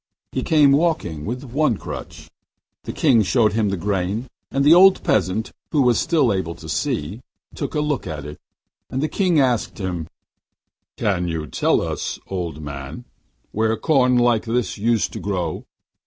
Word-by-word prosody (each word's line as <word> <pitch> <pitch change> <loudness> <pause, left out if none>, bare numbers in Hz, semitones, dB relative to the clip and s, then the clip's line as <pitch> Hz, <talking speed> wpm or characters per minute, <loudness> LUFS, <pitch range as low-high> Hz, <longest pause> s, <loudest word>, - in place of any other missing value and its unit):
He - - -2
came 150 -3 +4
walking 140 - 0
with 125 +4 -4
one 135 -2 0
crutch. - - -8 0.6
The - - -4
King 130 -8 +3
showed 110 +2 +2
him 110 -2 +1
the 100 - -2
grain, 100 +4 -1 0.2
and 140 +1 0
the 150 - +8
old 190 +2 +6
peasant, 105 +2 0 0.2
who 145 -3 +3
was 125 -2 +3
still 155 - +2
able 90 -3 -3
to 80 -1 -11
see, 80 +6 -2 0.3
took 145 +1 -5
a - - +1
good 150 - +1
look 140 -11 -2
at 75 -4 -5
it. 75 0 -9 0.5
And 130 +3 -2
the - - +1
King 180 -2 +1
asked 125 -5 +1
him: 90 -5 -4 0.9
'Can 90 -3 0
you 80 -1 -2
not 75 - -9
tell - - +2
us, - - -3
old 85 -5 -5
man, 70 - -7 0.5
where 110 +1 0
corn 125 -5 +3
like 120 -2 +2
this 120 +1 -1
used 115 +1 0
to - - -5
grow? 90 -5 -3
110 Hz, 175 wpm, -21 LUFS, 90-135 Hz, 0.9 s, the